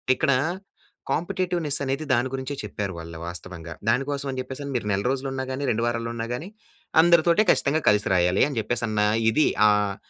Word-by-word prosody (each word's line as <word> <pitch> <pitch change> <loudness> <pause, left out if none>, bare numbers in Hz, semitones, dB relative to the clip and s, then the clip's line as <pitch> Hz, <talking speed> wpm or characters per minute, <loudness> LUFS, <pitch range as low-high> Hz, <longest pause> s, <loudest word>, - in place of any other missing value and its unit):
ఇక్కడ 140 0 +1 0.8
కాంపిటీటివ్‌నిస్సనేది, 155 -5 -1
దాని 120 +1 +2
గురించే 135 +2 -4
చెప్పారు 100 -3 -4
వాళ్ళ 85 0 -9
వాస్తవంగా. 85 -1 -8 0.2
దానికోసం 140 +4 0
అని 130 - -4
చెప్పేసని, 135 +2 -6
మీరు 105 -3 -5
నెల 100 - -1
రోజులు 135 0 -2
ఉన్నా 130 0 -3
గానీ, 130 +2 -3
2 115 +1 0
వారాలు 115 0 -2
ఉన్నా 115 0 -3
గానీ, 165 +10 -7 0.5
అందరితోటే 170 +3 +5
ఖచ్చితంగా 155 +3 +1
కలిసి 105 0 +2
రాయాలి 90 +1 +3
అని 140 - -6
చెప్పేసన్న 110 -1 -1 0.3
ఇది, 155 +7 +3 0.2
ఆహ్, 105 -1 +2
130 Hz, 160 wpm, -24 LUFS, 105-145 Hz, 0.8 s, అందరితోటే